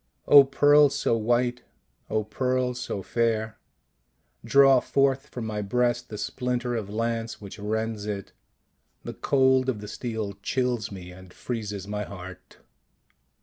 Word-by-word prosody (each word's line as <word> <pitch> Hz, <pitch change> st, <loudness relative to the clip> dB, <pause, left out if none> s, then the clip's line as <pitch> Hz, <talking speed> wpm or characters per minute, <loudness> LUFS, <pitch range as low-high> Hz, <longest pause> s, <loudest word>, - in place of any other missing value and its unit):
" -, -, -42 dB
O 140 Hz, -, +11 dB
Pearl 145 Hz, +2 st, +5 dB
so 115 Hz, -, 0 dB
white, 120 Hz, +2 st, 0 dB, 0.5 s
O 110 Hz, 0 st, 0 dB
Pearl 125 Hz, +3 st, -1 dB
so 120 Hz, -5 st, -5 dB
fair, 110 Hz, -1 st, -1 dB, 0.8 s
draw 135 Hz, +2 st, +6 dB
forth 135 Hz, +1 st, +1 dB
from 120 Hz, -3 st, -6 dB
my 105 Hz, -1 st, -3 dB
breast 120 Hz, +4 st, 0 dB
the 105 Hz, -, -6 dB
splinter 125 Hz, +2 st, -2 dB
of 105 Hz, -4 st, -4 dB
lance 115 Hz, +1 st, -2 dB
which 100 Hz, +1 st, -10 dB
rends 110 Hz, 0 st, -3 dB
it. 100 Hz, -2 st, -5 dB, 0.7 s
The -, -, -6 dB
cold 130 Hz, -1 st, +2 dB
of 115 Hz, -5 st, -2 dB
the 105 Hz, -, -8 dB
steel 110 Hz, -3 st, -5 dB
chills 125 Hz, -5 st, -1 dB
me 90 Hz, -2 st, -9 dB
and 95 Hz, 0 st, -14 dB
freezes 105 Hz, -5 st, -5 dB
my 105 Hz, 0 st, -3 dB
heart." 95 Hz, -2 st, -11 dB
115 Hz, 145 wpm, -26 LUFS, 105-125 Hz, 0.8 s, O